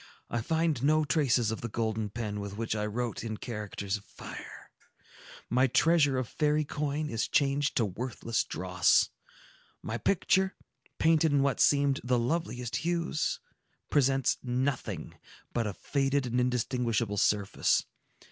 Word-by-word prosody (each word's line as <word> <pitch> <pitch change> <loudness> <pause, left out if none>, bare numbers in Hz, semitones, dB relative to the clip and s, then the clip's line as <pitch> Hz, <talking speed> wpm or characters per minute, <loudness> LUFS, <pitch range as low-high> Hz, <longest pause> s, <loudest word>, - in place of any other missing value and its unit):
"I 120 - 0
find 160 0 0
no 155 +2 +3
traces 130 -7 +2
of 110 - -4
the 120 - -3
golden 110 -1 -2
pen 105 -1 -4
with 100 0 -6
which 115 -1 -2
I 105 0 -1
wrote 120 +2 -3
in 110 -2 -4
characters 105 -3 -4
of 100 - -15
fire. - - -10 0.8
My 130 +2 +3
treasure 145 0 +3
of 130 -2 -1
fairy 150 +2 +1
coin 150 +1 -2
is 115 -5 -1
changed 140 0 +1
to 115 - +3
worthless 115 +3 -2
dross. 90 -2 +2 0.7
My 110 +2 -3
picture, 190 0 +2 0.4
painted 160 -1 +3
in 140 -1 +3
what 140 -2 +1
seemed 140 -2 +3
the 125 0 +2
loveliest 125 -2 -1
hues, 170 -2 -1 0.5
presents 135 -2 +2
nothing 120 - -2 0.3
but 115 -2 0
a 100 - -3
faded 140 -1 0
and 125 0 0
indistinguishable 120 -3 0
surface. 100 0 +2
125 Hz, 140 wpm, -30 LUFS, 110-145 Hz, 0.8 s, no